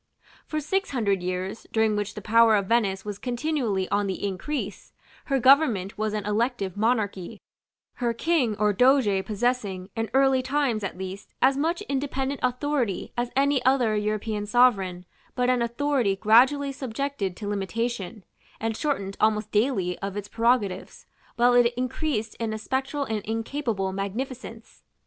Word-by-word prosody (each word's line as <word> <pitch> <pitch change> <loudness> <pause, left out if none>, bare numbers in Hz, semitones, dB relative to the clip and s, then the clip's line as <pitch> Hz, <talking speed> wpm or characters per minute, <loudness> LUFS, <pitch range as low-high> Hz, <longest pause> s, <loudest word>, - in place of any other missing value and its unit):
For 310 - -2
six 385 +6 -1
hundred 205 -8 0
years, 185 +3 -4
during 220 -1 +2
which 205 0 -3
the 210 - -7
power 225 +1 +5
of 200 -2 +1
Venice 195 -3 +1
was 205 -1 -5
continually 245 -7 -1
on 205 0 +1
the 190 +1 -3
increase, 205 +10 -4 0.3
her 275 -2 +1
government 250 -8 +4
was 215 0 -2
an 210 -2 -3
elective 210 -2 -1
monarchy, 210 -2 -1 0.6
her 240 -2 0
King 250 -2 +1
or 210 -1 +2
doge 245 -4 +3
possessing, 205 -3 -2
in 225 -2 -2
early 270 -1 +4
times 260 -5 0
at 190 - -4
least, 190 +1 -8
as 265 +1 +4
much 330 +6 0
independent 275 -3 -2
authority 250 -4 -1
as 240 0 -1
any 275 -1 +2
other 250 -4 +3
European 210 0 -2
sovereign, 195 -6 +3 0.3
but 250 0 +2
an 250 -1 +1
authority 235 -3 +1
gradually 255 +8 +4
subjected 260 -6 -3
to 210 - -6
limitation, 205 0 -3 0.4
and 225 0 -2
shortened 200 -9 -2
almost 215 0 +2
daily 205 -6 +1
of 195 0 -4
its 205 0 -5
prerogatives, 225 -5 0 0.3
while 245 +1 +4
it 245 -1 +5
increased 255 -3 -2
in 225 -1 -2
a - - -3
spectral 265 +5 -2
and 220 -5 -3
incapable 225 -3 -2
magnificence. 225 +4 -6
225 Hz, 150 wpm, -25 LUFS, 205-260 Hz, 0.6 s, power